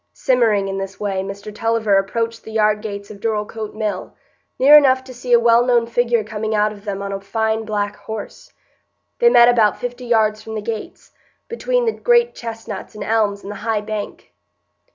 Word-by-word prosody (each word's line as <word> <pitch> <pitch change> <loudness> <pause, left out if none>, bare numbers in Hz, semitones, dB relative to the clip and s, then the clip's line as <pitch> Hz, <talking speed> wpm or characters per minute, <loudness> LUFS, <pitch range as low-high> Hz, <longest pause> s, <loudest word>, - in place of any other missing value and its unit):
Simmering 225 -6 +2
in 195 0 -3
this 195 0 -6
way, 195 -2 -2
Mr 200 +2 -7
Tulliver 220 -2 +1
approached 225 +3 -3
the 220 - -10
yardgates 210 -1 -1
of 205 - -11
Dorlcote 215 0 -3
Mill, 210 -4 -4 0.4
near 280 +3 +7
enough 260 -3 +5
to 260 -1 -11
see 245 0 -7
a 240 - +7
well 235 0 +4
known 240 -2 +2
figure 235 -1 +1
coming 220 +1 -3
out 210 0 +2
of 205 0 -13
them 200 -1 -4
on 200 - -4
a 195 0 -4
fine 220 +2 -1
black 205 -1 -2
horse. 220 -1 -8 0.7
They 475 - +6
met 240 - +7
about 225 -4 +3
fifty 245 0 -5
yards 215 -2 +2
from 220 0 -8
the 215 - -3
gates, 220 0 -6 0.4
between - - -1
the 450 - +2
great 475 +1 +2
chestnuts 225 -2 -7
and 210 - -6
elms 210 -2 0
and 200 - -7
the 205 - -7
high 215 0 -1
bank. 210 -1 -6
220 Hz, 190 wpm, -19 LUFS, 205-235 Hz, 0.7 s, near